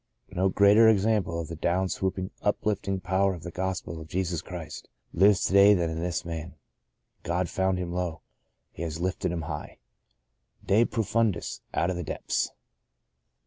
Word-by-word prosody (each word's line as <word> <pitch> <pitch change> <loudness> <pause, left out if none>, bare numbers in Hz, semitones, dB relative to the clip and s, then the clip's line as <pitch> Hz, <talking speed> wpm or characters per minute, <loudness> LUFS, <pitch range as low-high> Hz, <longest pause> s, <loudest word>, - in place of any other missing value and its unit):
No 95 +2 +1
greater 100 +4 +6
example 105 -5 +2
of 80 - -4
the 85 - -6
down 90 +4 0
swooping, 95 +1 -2
uplifting 100 -2 0
power 95 +1 +1
of 85 - -11
the 90 - -6
Gospel 90 -2 -3
of 80 - -10
Jesus 90 -2 -2
Christ 85 -4 -8 0.2
lives 95 +2 +4
to - - -1
day 100 +1 +7
than 80 -3 -1
this 85 0 -2
man. 80 0 -6 0.7
God 85 +2 -1
found 95 +1 0
him 90 -1 -3
low. 90 -3 -3 0.5
He - - -10
has 80 -1 -4
lifted 90 -1 -1
him 85 -2 -3
high. - - -6 0.9
De 110 +4 +4
profimdis 110 -3 -1
— - - -40
out 90 - +1
of 90 - -3
the 90 - -3
depths - - -2
90 Hz, 165 wpm, -27 LUFS, 85-100 Hz, 0.9 s, day